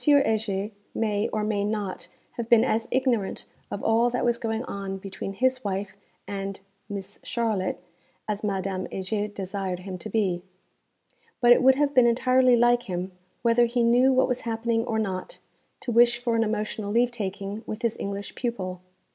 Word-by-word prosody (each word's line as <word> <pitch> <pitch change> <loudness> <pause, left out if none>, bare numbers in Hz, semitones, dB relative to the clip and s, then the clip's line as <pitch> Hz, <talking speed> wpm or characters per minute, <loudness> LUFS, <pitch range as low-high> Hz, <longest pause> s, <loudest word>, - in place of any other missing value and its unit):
Heger 220 -8 +2 0.2
may, 210 -1 0
or 215 - -2
may 210 -1 0
not, 205 -2 -3 0.2
have 235 -1 -5
been 235 -2 +7
as 225 +1 0
ignorant 250 -6 0 0.2
of 200 - -5
all 230 +2 +3
that 245 0 -1
was 235 -1 +2
going 225 -1 -2
on 195 -4 -5
between 195 0 -6
his 255 +4 +1
wife 195 -1 -3 0.3
and 195 -1 -4 0.3
'Mees 200 0 -6
Charlotte' 215 -7 -1 0.4
as 210 0 -2
Madame 195 -2 -2
Heger 205 +2 -2
desired 190 -2 -4
him 185 -1 -6
to 215 - -7
be. 190 -6 0 1.0
But 240 -1 +5
it - - +2
would 265 0 +6
have 285 +1 +1
been 250 -3 +6
entirely 255 +1 +4
like 240 -1 +3
him, 180 +1 -3 0.3
whether 235 0 +5
he 240 0 +1
knew 245 +3 +5
what 260 0 +4
was 250 -1 -1
happening 230 0 0
or 225 - -1
not, 190 -4 -3 0.4
to 245 - -3
wish 240 +1 +5
for 240 -1 -1
an 225 - +3
emotional 215 -1 -2
leave 240 +2 +3
taking 200 -2 -4
with 215 +3 -5
his 230 -2 +1
English 200 0 -4
pupil. 185 -7 -3
220 Hz, 170 wpm, -26 LUFS, 195-240 Hz, 1.0 s, been